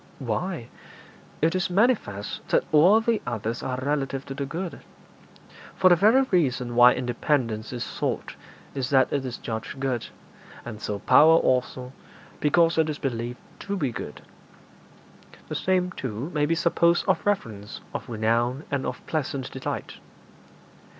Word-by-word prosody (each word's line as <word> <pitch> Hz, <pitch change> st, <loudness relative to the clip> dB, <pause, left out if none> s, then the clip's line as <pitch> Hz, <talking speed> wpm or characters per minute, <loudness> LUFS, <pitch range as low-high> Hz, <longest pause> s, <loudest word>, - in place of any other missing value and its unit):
'Why, 130 Hz, -, -3 dB, 0.7 s
it 165 Hz, -, +4 dB
is 185 Hz, -1 st, 0 dB
manifest 180 Hz, -, 0 dB
that -, -, +3 dB
all 180 Hz, +9 st, +6 dB
the 225 Hz, -1 st, +1 dB
others 115 Hz, 0 st, -3 dB
are 130 Hz, -1 st, -3 dB
relative 135 Hz, -1 st, -2 dB
to 135 Hz, -, -6 dB
the 140 Hz, 0 st, -4 dB
good. 170 Hz, +4 st, -5 dB, 0.9 s
For 185 Hz, -, +5 dB
the -, -, +8 dB
very 220 Hz, +9 st, +5 dB
reason 130 Hz, -9 st, +1 dB
why 125 Hz, +1 st, +8 dB
independence 120 Hz, -2 st, -1 dB
is 120 Hz, -2 st, -3 dB
sought -, -, -3 dB, 0.4 s
is 135 Hz, -2 st, -2 dB
that 135 Hz, -2 st, +3 dB
it 140 Hz, -2 st, 0 dB
is 125 Hz, -2 st, -5 dB
judged 110 Hz, +4 st, -5 dB
good, 130 Hz, -3 st, -2 dB, 0.6 s
and 110 Hz, -2 st, -7 dB
so 105 Hz, -1 st, -3 dB
power 160 Hz, +9 st, +6 dB
also, 125 Hz, -2 st, 0 dB, 0.5 s
because 165 Hz, +2 st, +3 dB
it 160 Hz, -1 st, +3 dB
is 150 Hz, -, -3 dB
believed 120 Hz, -3 st, -3 dB, 0.2 s
to 200 Hz, 0 st, -3 dB
be 140 Hz, -8 st, -1 dB
good. -, -, -7 dB, 1.3 s
The -, -, -4 dB
same, 185 Hz, -1 st, +1 dB
too, 130 Hz, +1 st, -5 dB
may 150 Hz, -1 st, +1 dB
be 165 Hz, -, +2 dB
supposed 170 Hz, +1 st, +2 dB
of 190 Hz, -, +2 dB
reverence, 110 Hz, -, -2 dB
of -, -, -5 dB
renown, 120 Hz, +4 st, 0 dB
and 140 Hz, -2 st, -1 dB
of 125 Hz, -, -6 dB
pleasant 140 Hz, -4 st, -3 dB
delight. 130 Hz, -, -5 dB
135 Hz, 150 wpm, -25 LUFS, 120-165 Hz, 1.3 s, the